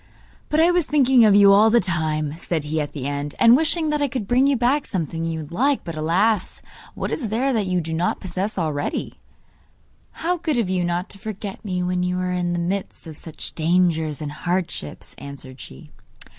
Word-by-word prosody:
'But 300 - +1
I 335 +2 +5
was 350 -3 +1
thinking 265 -4 +4
of 205 -2 +5
you 200 -1 +7
all 210 +3 +6
the 235 +2 +5
time,' 155 -5 -1
said 165 -3 -2
he 155 +1 -1
at 145 - -5
the 135 -4 -5
end, 145 +1 -3
'and 235 +1 +7
wishing 315 +2 +1
that 300 -1 0
I 285 - +2
could 250 -6 -4
bring 255 +3 +3
you 280 -2 +2
back 255 +5 +1
something 165 -3 -3
you 165 -1 -2
would 150 - -10
like. 270 +9 +1
But, 165 - -6
alas! 180 +7 0 0.3
what - - -3
is 250 - -2
there 255 +5 0
that 215 -4 0
you 180 -1 +1
do 160 0 -5
not 170 +2 0
possess 190 +3 -4
already?' 155 -5 -3 0.9
'How 355 +2 -1
good 315 -5 -1
of 210 -6 0
you 180 -1 0
not 175 +2 -1
to 200 - -11
forget 205 -2 -6
me 180 -4 -2
when 180 0 -1
you 180 0 -1
are 180 0 -1
in 175 -1 -1
the - - -1
midst 185 +3 -3
of 160 -2 -9
such 160 +1 -7
dangers 160 -2 +1
and 145 - -4
hardships,' 175 - -4
answered 135 -2 -10
she. 65 - -12
180 Hz, 210 wpm, -22 LUFS, 160-235 Hz, 0.9 s, you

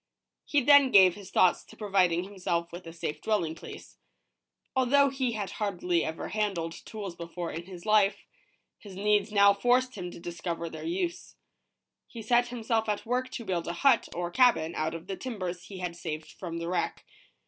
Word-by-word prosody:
He 290 - +2
then 285 0 +7
gave 190 -6 +7
his 200 -1 -11
thoughts 180 - +3
to - - -16
providing 185 -5 +2
himself 180 -3 -3
with 175 0 -9
a - - -7
safe 165 -2 -5
dwelling 200 -8 0
place. 165 - -11 0.8
Although 275 +2 +4
he 260 -3 -1
had 205 -4 -4
hardly 180 -4 -1
ever 160 +1 -4
handled 195 -6 -1
tools 200 -5 -6
before 170 0 -6
in 165 +2 -6
his 180 -2 -10
life, 210 -2 +3 0.5
his 200 -3 -11
needs 210 +1 +1
now 200 -1 +6
forced 250 +4 +2
him 180 -5 -6
to 175 - -10
discover 170 -1 -5
their - - -7
use. 345 0 -3 0.7
He 230 -2 -9
set 240 +2 +3
himself 225 -2 -1
at 210 +2 -2
work 250 +2 -1
to 235 -2 -7
build 175 -4 -2
a 170 - -2
hut, 260 -4 +5
or 175 0 -3
cabin, 235 -9 +3
out 160 0 -2
of 165 0 -8
the 195 0 -4
timbers 185 -7 -5
he 195 - -9
had 180 -2 -4
saved 155 -2 -6
from 170 -3 -6
the 170 0 -4
wreck. 175 0 -2
195 Hz, 185 wpm, -29 LUFS, 170-230 Hz, 0.8 s, then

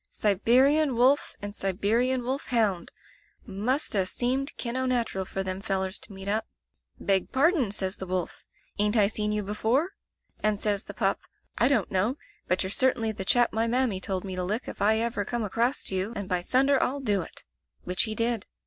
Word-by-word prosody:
'Siberian 255 +8 +3
wolf 255 +4 +3
and 205 0 -4
Sibe 195 -1 -3
rian 245 +5 +2
wolf 265 +3 -3
hound! 210 -8 0 0.5
Must 235 +8 -1
'a 190 -3 +1
seemed 260 +7 -1
kin' 235 0 -3
o' 260 0 0
natural 235 -6 0
for 195 +1 -3
them 190 0 -4
fellers 190 -2 -2
to - - -11
meet 195 0 -8
up. 215 +2 0 0.5
"Beg 195 -2 +1
pardon," 285 - +3
says 190 -1 -2
the 190 - -6
wolf, 180 -1 -3 0.4
"ain't 210 +2 +2
I 210 - +6
seen 210 0 -1
you 210 0 -1
be 200 +2 -4
fore?" 260 - +1 0.3
— - - -45
and 210 -1 +2
says 210 -1 0
the - - -9
pup, - - +1 0.4
"I 240 - +5
don't 245 -9 +1
know, 210 +9 +1 0.3
but 185 +1 +1
you're 190 - -4
certainly 240 -2 +2
the 200 - -5
chap 240 +5 +3
my 225 +1 +1
mammy 240 -5 +1
told 190 -1 -3
me 190 -1 -4
to 180 - -2
lick 210 +7 -2
if - - -7
ever 220 +1 +2
I - - 0
come 235 +3 -3
acrost 230 +6 -1
you, 190 +4 -1
and, 200 -3 -4
by 180 -1 0
thunder, 270 +7 +3
I'll 275 +3 0
do 205 -8 +1
it!" - - -10 0.4
Which 180 +4 +1
he 220 -1 -3
did. 230 -1 0
215 Hz, 205 wpm, -27 LUFS, 195-250 Hz, 0.5 s, I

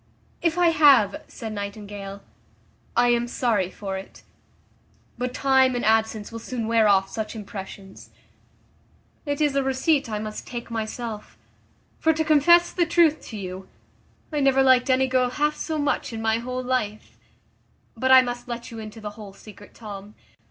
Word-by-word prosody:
"If 335 0 0
I 350 -1 +5
have," 280 -11 +5
said 220 -2 -7
Nightingale, 200 -1 -7 0.7
"I 245 0 +4
am 240 0 +2
sorry 225 -7 0
for 195 -1 -5
it; 190 - -13 1.0
but 250 0 -2
time 265 -1 +3
and 245 - -2
absence 220 -1 +1
will 230 - -6
soon 230 0 -4
wear 225 -1 +3
off 195 -1 +4
such 220 0 -5
impressions. 195 -2 -9 1.2
It 285 0 -1
is 295 -2 +1
a 275 - +3
receipt 270 +1 +1
I 215 - -2
must 215 0 -6
take 240 -1 -7
myself; 220 -1 -5 0.6
for, 320 - +3
to 315 0 -1
confess 345 +3 +5
the 345 -2 +1
truth 335 -2 +3
to 220 - -7
you 190 -1 -7 0.6
I 300 - 0
never 270 -1 +4
liked 260 0 +4
any 260 0 +4
girl 255 -1 +1
half 295 +4 0
so 315 0 -3
much 290 -3 -1
in 225 - -5
my 225 0 +1
whole 255 +1 -4
life; 245 -5 -3 0.8
but 260 0 0
I 260 0 +9
must 245 0 -5
let 235 0 -6
you 225 - -8
into 220 +1 -9
the 210 -1 -5
whole 205 -2 -11
secret, 205 0 -15
Tom. 205 -2 -9
235 Hz, 165 wpm, -24 LUFS, 210-265 Hz, 1.2 s, I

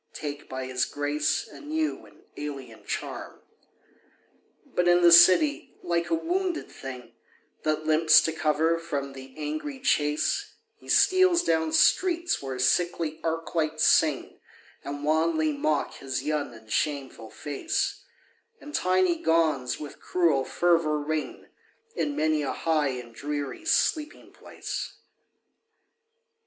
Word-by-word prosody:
Take 145 -1 -7
by 130 0 -5
his 130 0 -1
grace 145 0 -1
a - - -13
new 310 +1 -3
and - - -21
alien 135 -6 -7
charm. - - -5 1.3
But 175 - -1
in 175 0 +5
the 170 - +7
city, 185 - +6
like 170 0 -1
a - - +2
wounded 350 +1 -2
thing 130 -2 -9 0.5
That 155 0 -1
limps 160 +1 +6
to 160 - -1
cover 160 +1 +1
from 140 -5 -4
the 135 0 -12
angry 155 - -4
chase, 155 - 0 0.2
He - - -17
steals 370 -2 +4
down 160 -1 +1
streets 345 - +2
where 135 -2 -5
sickly 160 +3 0
arc 165 0 -3
lights 155 -1 0
sing, 155 -3 +2 0.4
And 145 +1 -6
wanly 155 0 +1
mock 145 0 -1
his 135 -2 -4
young 150 -4 -2
and 110 -1 -15
shameful 135 -6 -2
face; 145 +3 -3 0.6
And 295 - -11
tiny 185 -4 +2
gongs 155 -6 +1
with 150 -1 -9
cruel 160 -7 +1
fervor 165 -3 +2
ring 155 +1 -4 0.5
In 290 -8 -1
many 155 -1 +1
a 135 -3 -2
high 155 -1 0
and 125 -3 -6
dreary 145 - -5
sleeping 310 -2 0
place. - - -7
155 Hz, 130 wpm, -26 LUFS, 145-175 Hz, 1.3 s, the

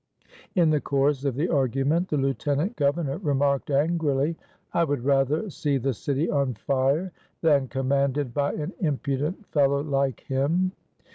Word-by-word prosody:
In 170 -4 +4
the 150 -2 +2
course 140 0 +1
of 135 -4 0
the 150 +6 0
argument 140 +5 +1
the 150 - 0
Lieutenant 145 - 0
Governor 145 +1 0
remarked 140 -5 0
angrily: 150 0 +1 0.4
"I 170 - +3
would 145 -6 -2
rather 140 +7 +2
see 145 -3 0
the 135 +1 -1
city 140 +7 -1
on 140 -4 0
fire 140 - 0 0.3
than 145 -4 +3
commanded 135 0 0
by 145 +1 0
an 150 - -4
impudent 150 +4 -2
fellow 140 -1 +3
like 140 -3 -1
him." 155 +7 0
140 Hz, 145 wpm, -25 LUFS, 135-155 Hz, 0.4 s, In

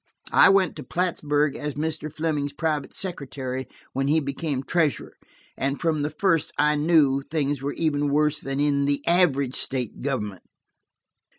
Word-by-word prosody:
I - - +7
went 190 -1 +3
to - - -6
Plattsburg 150 -5 0
as 150 -1 -4
Mr. 155 0 -3
Fleming's 150 -2 -2
private 155 -1 -2
secretary 135 -7 -3 0.3
when 135 +1 0
he 155 +3 +3
became 140 -1 -3
treasurer, 160 -1 0 0.4
and 135 +1 -2
from 160 -2 0
the 145 +1 -1
first 165 0 +1
I 150 0 +3
knew 145 -3 +3
things 145 -2 -2
were 140 +1 -2
even 145 -3 0
worse 150 +1 +2
that 135 0 -4
the 140 0 +1
average 140 -7 +3
state 125 -5 -3
government. 105 -9 -3
145 Hz, 150 wpm, -25 LUFS, 140-160 Hz, 0.4 s, I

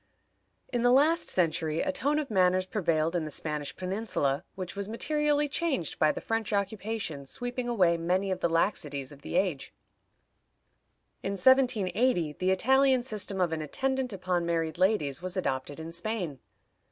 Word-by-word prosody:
In 240 - +1
the 245 - +4
last 305 +6 +4
century 160 -3 +1
a 285 - 0
tone 280 +2 0
of 295 -5 -2
manners 185 -1 +3
prevailed 165 -5 0
in 170 - 0
the 155 - -4
Spanish 150 0 -3
peninsula 185 -8 -1
which 185 -1 -6
was 200 0 -4
materially 295 +5 +1
changed 280 - -2
by 155 - +4
the - - -5
French 225 -1 -2
occupation 200 -7 -3
sweeping 245 - -4
away 180 -8 +3
many 185 +4 0
of 185 - -1
the 170 - +1
laxities 150 -5 -1
of 140 -1 -13
the - - -6
age. 180 -7 0 1.5
In 195 - -2
1780 220 - +3
the 185 +4 -1
Italian 260 +6 +4
system 210 -5 -4
of 175 -3 +1
an 160 - -2
attendant 265 - -1
upon 185 -2 -1
married 165 -1 -1
ladies 175 -8 +1
was 185 +1 -4
adopted 140 -4 -2
in 160 +1 -6
Spain. 170 - -3
185 Hz, 160 wpm, -29 LUFS, 165-240 Hz, 1.5 s, the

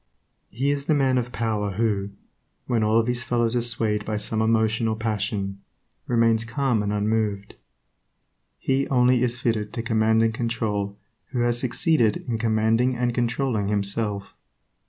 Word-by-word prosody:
He 135 +5 0
is 140 0 -3
the 155 - +3
man 130 -2 +2
of 125 0 -4
power 105 -4 -1
who, 100 -1 0 0.6
when 115 -3 +1
all 110 +1 +3
his 120 0 0
fellows 120 -1 +1
are 120 - +2
swayed 110 -3 -1
by 105 0 -2
some 110 +1 -2
emotion 110 0 +2
or 110 - 0
passion, 105 -3 -2 0.5
remains 115 -2 +3
calm 120 -1 0
and 105 0 -1
unmoved. 105 -1 -1 1.0
He 135 +1 0
only 125 -1 +3
is 120 -1 0
fitted 110 -4 -1
to 115 - -2
command 110 0 +2
and 115 0 +1
control 110 -4 -2 0.3
who 125 -2 -2
has 120 0 +1
succeeded 125 - +1
in 115 -2 -1
commanding 115 +3 +2
and 120 0 0
controlling 120 -3 0
himself. 100 0 -2
115 Hz, 155 wpm, -24 LUFS, 105-120 Hz, 1.0 s, the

